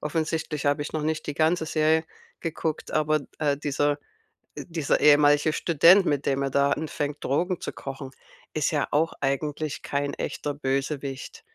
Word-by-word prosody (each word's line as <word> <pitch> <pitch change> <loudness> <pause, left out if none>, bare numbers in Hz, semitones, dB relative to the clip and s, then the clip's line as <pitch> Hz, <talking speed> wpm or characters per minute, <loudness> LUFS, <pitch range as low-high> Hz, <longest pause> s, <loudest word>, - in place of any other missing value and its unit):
offensichtlich 155 -1 -2
habe 145 0 +2
ich 145 - -5
noch 155 - -1
nicht 155 0 -2
die 150 - -3
ganze 160 +1 +2
Serie 160 0 +2 0.4
geguckt, 160 -1 -3
aber, 155 0 +2 0.2
äh, 145 -2 +1
dieser, 145 0 0 0.6
äh - - -6
dieser 165 -4 0
ehemalige 145 +1 +5
Student, 170 +5 +5
mit 145 -3 0
dem 140 0 +1
er 135 - -1
da 140 +1 +2
anfängt, 150 -2 -3
Drogen 175 +6 0
zu - - -5
kochen, 135 0 -7 0.4
ist 155 +1 0
ja 145 -2 0
auch 160 +3 +2
eigentlich 145 +2 -2
kein 140 0 -2
echter 145 - -3
Bösewicht. 135 -1 -3
150 Hz, 160 wpm, -26 LUFS, 140-155 Hz, 0.6 s, ehemalige